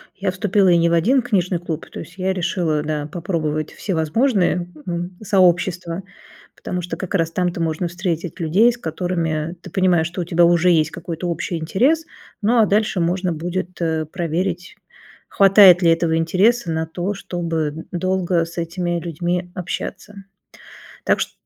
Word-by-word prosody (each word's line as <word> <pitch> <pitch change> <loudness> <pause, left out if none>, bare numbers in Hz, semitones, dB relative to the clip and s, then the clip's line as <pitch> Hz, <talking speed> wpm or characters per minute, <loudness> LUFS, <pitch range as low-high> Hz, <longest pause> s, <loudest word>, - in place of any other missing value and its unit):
Я 190 -1 -1
вступила 190 0 +2
и 170 - +5
не 170 0 +3
в - - 0
1 245 +11 +3
книжный 185 -7 0
клуб, 165 -2 -5
то - - -7
есть 175 +2 -10
я 190 +1 0
решила, 170 -4 -1
да, 150 -1 -3
попробовать 155 -3 -3
всевозможные, 180 - 0 0.2
м, 175 +1 -4
сообщества, 180 -2 +1 0.5
потому 180 -1 -4
что 165 -1 -5
как 190 +1 -4
раз 165 -2 +1
там-то 175 0 -1
можно 165 +2 -1
встретить 175 -1 -4
людей, 190 +9 +4
с 240 - -8
которыми 165 -3 -2
ты - - -10
понимаешь, 180 -4 +2
что 180 +1 -5
у - - -3
тебя 170 0 +3
уже 175 +1 +4
есть 155 -2 +2
какой-то 175 0 -5
общий 170 +1 -3
интерес. 260 - +1 0.4
Ну, 230 +3 +3
а 220 - +6
дальше 210 -2 +1
можно 180 +1 0
будет, 175 +2 -4
э, 160 -1 0
проверить, 175 +2 -3 0.5
хватает 195 -2 +7
ли 165 -1 +5
этого 165 -1 +1
интереса 185 +4 +2
на 160 0 -1
то, 180 +5 -3
чтобы 165 -5 -3
долго 180 -1 0
с 170 +1 -12
этими 170 +1 -2
людьми 175 +2 -3
общаться, 195 +3 -5 0.9
так - - +2
что - - -2
175 Hz, 160 wpm, -20 LUFS, 165-185 Hz, 0.9 s, хватает